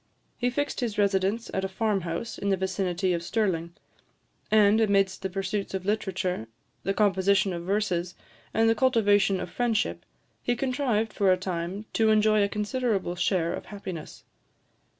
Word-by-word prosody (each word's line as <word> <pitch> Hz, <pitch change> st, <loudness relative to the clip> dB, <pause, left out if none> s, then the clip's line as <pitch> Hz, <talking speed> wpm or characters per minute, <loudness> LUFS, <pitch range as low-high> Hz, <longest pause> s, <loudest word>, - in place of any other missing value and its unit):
He 245 Hz, -, 0 dB
fixed 290 Hz, +3 st, -2 dB
his 235 Hz, -5 st, -2 dB
residence 200 Hz, +2 st, +1 dB
at 190 Hz, -, -1 dB
a -, -, 0 dB
farm 200 Hz, +1 st, 0 dB
house 170 Hz, +7 st, -4 dB
in 200 Hz, -, -1 dB
the 195 Hz, -, +2 dB
vicinity 185 Hz, -1 st, -1 dB
of 170 Hz, -, -1 dB
Stirling; 170 Hz, -3 st, -1 dB, 0.7 s
and, 215 Hz, 0 st, +5 dB
amidst 195 Hz, -3 st, +2 dB
the 190 Hz, -, -2 dB
pursuits 195 Hz, +1 st, -3 dB
of 190 Hz, -1 st, -4 dB
literature, 190 Hz, -, -1 dB, 0.3 s
the 195 Hz, +1 st, -1 dB
composition 195 Hz, -1 st, +3 dB
of 170 Hz, 0 st, -5 dB
verses, 180 Hz, -3 st, -1 dB, 0.4 s
and 225 Hz, 0 st, +3 dB
the 225 Hz, -, +5 dB
cultivation 205 Hz, -5 st, +3 dB
of -, -, -5 dB
friendship, 235 Hz, -3 st, 0 dB, 0.4 s
he 245 Hz, -, 0 dB
contrived, 250 Hz, -5 st, 0 dB
for 195 Hz, -3 st, +3 dB
a 185 Hz, -, +4 dB
time, 185 Hz, +2 st, -4 dB
to 220 Hz, -1 st, +3 dB
enjoy 215 Hz, 0 st, +4 dB
a 200 Hz, -, +2 dB
considerable 210 Hz, -3 st, -1 dB
share 180 Hz, -2 st, +1 dB
of -, -, -6 dB
happiness. 190 Hz, -5 st, -8 dB
200 Hz, 160 wpm, -27 LUFS, 185-220 Hz, 0.7 s, and